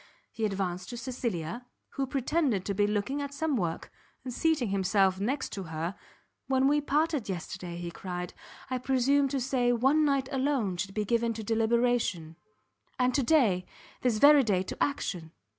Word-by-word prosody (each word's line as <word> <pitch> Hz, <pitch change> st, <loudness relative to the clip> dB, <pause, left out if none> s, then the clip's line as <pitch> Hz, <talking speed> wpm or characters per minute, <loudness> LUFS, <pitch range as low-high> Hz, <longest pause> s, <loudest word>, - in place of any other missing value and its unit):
He 225 Hz, -, -2 dB
advanced 190 Hz, -3 st, -2 dB
to 240 Hz, -, -6 dB
Cecilia, 235 Hz, -3 st, -4 dB, 0.2 s
who 275 Hz, -1 st, -3 dB
pretended 270 Hz, -, 0 dB
to 200 Hz, -, -1 dB
be 205 Hz, +1 st, +2 dB
looking 210 Hz, +7 st, -1 dB
at 280 Hz, 0 st, -5 dB
some 310 Hz, -1 st, 0 dB
work, 170 Hz, -7 st, -2 dB, 0.3 s
and 250 Hz, -1 st, -5 dB
seating 310 Hz, -6 st, +1 dB
himself 195 Hz, -1 st, +2 dB
next 255 Hz, +8 st, -2 dB
her, 165 Hz, -2 st, -4 dB, 0.5 s
"when 265 Hz, 0 st, +3 dB
we 295 Hz, +1 st, +3 dB
parted 295 Hz, -4 st, 0 dB
yesterday," 180 Hz, -1 st, -5 dB
he 175 Hz, 0 st, -5 dB
cried, 180 Hz, 0 st, -5 dB, 0.4 s
"I 255 Hz, -, 0 dB
presumed 270 Hz, +2 st, +2 dB
to 275 Hz, 0 st, -1 dB
say 250 Hz, -1 st, +1 dB
one 270 Hz, +6 st, +3 dB
night 275 Hz, -3 st, +1 dB
alone 260 Hz, -9 st, 0 dB
should 195 Hz, +2 st, -4 dB
be 210 Hz, -1 st, 0 dB
given 230 Hz, +2 st, +1 dB
to 220 Hz, 0 st, -6 dB
deliberation, 225 Hz, -7 st, +1 dB, 0.6 s
and 250 Hz, 0 st, +2 dB
to 280 Hz, -, +2 dB
day, 230 Hz, -, +3 dB, 0.3 s
this 245 Hz, -4 st, +1 dB
very 290 Hz, +4 st, +7 dB
day 200 Hz, -7 st, +1 dB
to -, -, -2 dB
action! 175 Hz, -, -3 dB
235 Hz, 165 wpm, -29 LUFS, 190-270 Hz, 0.6 s, very